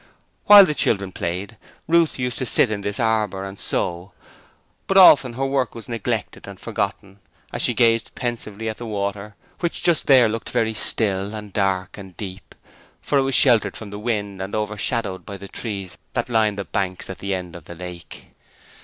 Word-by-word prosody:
While 205 -1 +10
the 150 - -1
children 100 -9 0
played 95 +6 -4 0.3
Ruth 165 -1 +3
used 125 -1 -2
to 130 - -1
sit 115 - +2
in 105 -1 -2
this 100 +3 -4
arbour 110 -4 0
and 95 0 -8
sew, 90 +2 -2 0.7
but 195 - +2
often 140 -9 +8
her 135 +3 -2
work 135 -2 -1
was 115 - -9
neglected 115 -4 -3
and - - -10
forgotten 100 0 -4 0.3
as - - -3
she - - +1
gazed 115 -1 +2
pensively 115 -3 -4
at 110 - -4
the 120 - -6
water, 100 0 -4 0.2
which 170 -1 -2
just 170 -3 +2
there 130 -4 +7
looked 110 +1 -4
very 110 -1 0
still, 100 -1 -1
and 105 -2 -8
dark, 95 -1 -1
and 95 -2 -12
deep, 95 -2 -8 0.4
for 140 - +1
it - - +4
was 135 -1 0
sheltered 120 -5 +4
from 105 -3 -9
the 105 - -6
wind 105 -4 -3
and 95 +1 -4
over 105 0 -2
shadowed 105 -3 -2
by 100 -2 -8
the 100 +1 -10
trees 100 -4 -6
that - - -2
lined 110 -3 +2
the 100 - -4
banks 95 -2 -2
at 95 - -8
the 100 -1 -2
end 90 -2 -7
of 85 -3 -11
the 85 - -9
lake. 90 -1 -10
105 Hz, 195 wpm, -22 LUFS, 95-120 Hz, 0.7 s, While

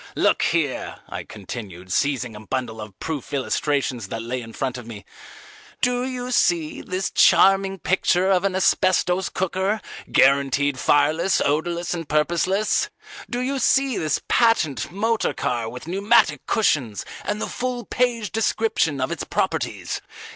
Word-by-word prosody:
Look - - +2
here," 160 -6 0
I - - -5
continued, 95 -3 -8
seizing 125 -4 0
a - - -8
bundle 110 0 -4
of 105 -3 -10
proof 155 -4 -5
illustrations 135 -4 -1
that 115 +3 -5
lay 125 +2 -3
in 115 -1 -10
front 130 +1 -3
of 120 - -11
me, 105 -3 -9 0.7
"do 245 0 +1
you 250 -1 -4
see 170 -9 +1
this 185 +1 -3
charming 195 0 +5
picture 185 0 +1
of 185 -1 +3
an 195 -2 0
Asbestos 185 -1 +2
Cooker, 190 +3 -1 0.3
guaranteed 140 0 +3
fireless, 155 +7 +3
odourless, 170 +4 0
and 165 -3 -5
purposeless? 180 - +1 0.4
Do 245 0 -2
you 270 +2 -1
see 265 0 +3
this 155 -6 0
patent 155 - +2
motor 220 +4 0
car 115 -2 -2
with 125 +2 -9
pneumatic 205 +5 +2
cushions, 135 - +1 0.2
and 210 0 -2
the - - -1
full 245 -2 -3
page 235 -5 0
description 220 -9 0
of 130 - -1
its - - -3
properties? - - -2
170 Hz, 145 wpm, -23 LUFS, 130-205 Hz, 0.7 s, charming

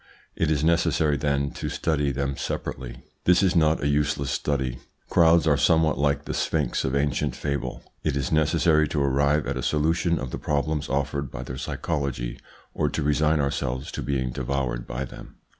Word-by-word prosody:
It 80 - +1
is 75 -2 +1
necessary, 80 -2 +2
then, 70 -1 0
to - - -4
study 75 -3 0
them 70 0 -2
separately. 65 -2 -5 0.2
This 90 +2 +5
is 95 -1 +2
not 80 -2 +3
a - - +2
useless 70 -1 0
study. 65 -4 -1 0.3
Crowds 85 -1 +5
are 75 -3 +4
somewhat 80 -1 +3
like 70 0 +1
the - - -3
sphinx 75 -6 0
of 65 +1 -1
ancient 70 -1 0
fable: 70 -3 -3 0.2
it 70 - 0
is 65 -3 -2
necessary 80 0 +3
to 70 -1 0
arrive 70 +2 +2
at 70 -1 -2
a - - -2
solution 80 +5 +1
of 65 -2 -5
the - - -4
problems 75 0 -1
offered 70 0 -1
by - - -6
their 65 0 -6
psychology 70 -6 -3 0.3
or 75 - 0
to 75 - -2
resign 75 +1 +2
ourselves 70 -2 -2
to - - -4
being 65 -3 -1
devoured 65 -1 -2
by 65 +2 -3
them. - - -12
70 Hz, 180 wpm, -25 LUFS, 70-75 Hz, 0.3 s, This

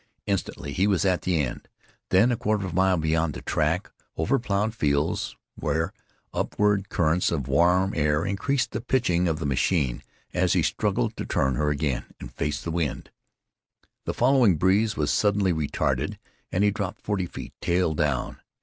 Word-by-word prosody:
Instantly 90 -7 -3
he 95 +6 +2
was 100 -3 +2
at 90 -2 +2
the 90 -2 0
end; 65 -5 -3 0.4
then 105 +7 +4
a - - +2
quarter 105 -2 -1
of 95 - -4
a - - -7
mile 95 0 +3
beyond 80 -1 0
the - - -6
track, - - 0 0.3
over 135 +2 +1
plowed 105 -1 0
fields, 75 -7 0 0.2
where - - -1 0.4
upward 105 -1 +1
currents 85 +1 +1
of 70 -6 -2
warm 90 +7 +3
air 75 +1 +1
increased 125 +7 0
the 110 - -3
pitching 105 -9 +1
of 80 -2 0
the 80 - -4
machine 70 -2 +1 0.3
as - - +2
he - - +2
struggled - - 0
to - - -3
turn 65 0 +1
her 75 +4 0
again 75 -3 -1
and - - -9
face 75 -1 -2
the 85 - -3
wind. 80 -3 -2 0.9
The - - -2
following 125 - +4
breeze 100 +6 +2
was 75 -1 +1
suddenly 100 -3 +2
retarded 80 -3 -1 0.3
and 95 - +1
he 105 - +4
dropped 100 -2 -4
forty 100 -4 -1
feet, - - -9
tail 85 -2 +1
down. 75 -4 -1
90 Hz, 175 wpm, -25 LUFS, 75-100 Hz, 0.9 s, then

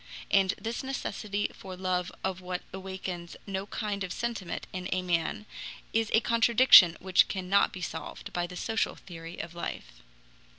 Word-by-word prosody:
And 195 -1 +4
this 230 +3 -4
necessity 210 -6 -2
for 190 -1 -9
love 180 -1 -1
of 190 -1 -2
what 180 0 -4
awakens 190 -2 -6
no 195 0 -3
kind 205 -3 -3
of 185 - -4
sentiment 230 -6 -3
in 185 0 -4
a 185 0 0
man 175 +3 -1 0.5
is 225 -1 +2
a 225 - +5
contradiction 230 -7 +7
which 185 -1 +4
cannot 190 +1 +2
be 185 - -8
solved 160 - -6
by 175 0 -1
the 180 - -9
social 225 +2 0
theory 165 -1 -10
of 165 - -6
life. 170 - -6
190 Hz, 160 wpm, -29 LUFS, 180-205 Hz, 0.5 s, contradiction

